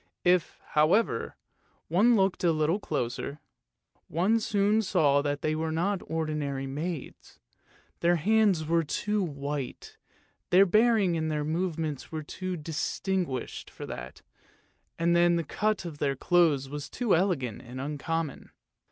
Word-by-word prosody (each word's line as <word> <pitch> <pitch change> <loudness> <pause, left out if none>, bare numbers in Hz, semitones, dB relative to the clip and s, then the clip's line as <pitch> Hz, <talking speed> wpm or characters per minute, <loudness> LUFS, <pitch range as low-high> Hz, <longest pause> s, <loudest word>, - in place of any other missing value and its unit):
If, 180 -1 +2
however, 155 - +2 0.5
one 210 +9 +4
looked 195 -3 +1
a 170 - +4
little 155 +4 +1
closer, 140 - -3 0.7
one 195 +8 +2
soon 210 0 +2
saw 155 -9 +3
that 145 0 -2
they 155 - +1
were 160 +1 -2
not 180 +4 0
ordinary 150 -4 -2
maids; 150 +2 -6 0.6
their 175 +1 +3
hands 200 -1 +3
were 165 +1 +2
too 210 +7 -1
white, 140 -5 -5 0.5
their 190 +2 +6
bearing 215 -2 +3
and 160 0 -1
their 150 -1 -1
movements 160 -3 -2
were 155 -1 -4
too 185 +4 -5
distinguished 160 0 -3
for - - -8
that, 60 +1 -8 0.7
and 170 +1 +2
then 175 0 +4
the 170 - 0
cut 210 +5 -1
of 155 -4 -7
their 140 -2 0
clothes 155 -3 +3
was 145 0 -6
too 235 - +1
elegant 160 - 0
and 125 +2 -9
uncommon. 150 +2 -3
165 Hz, 135 wpm, -28 LUFS, 145-185 Hz, 0.7 s, their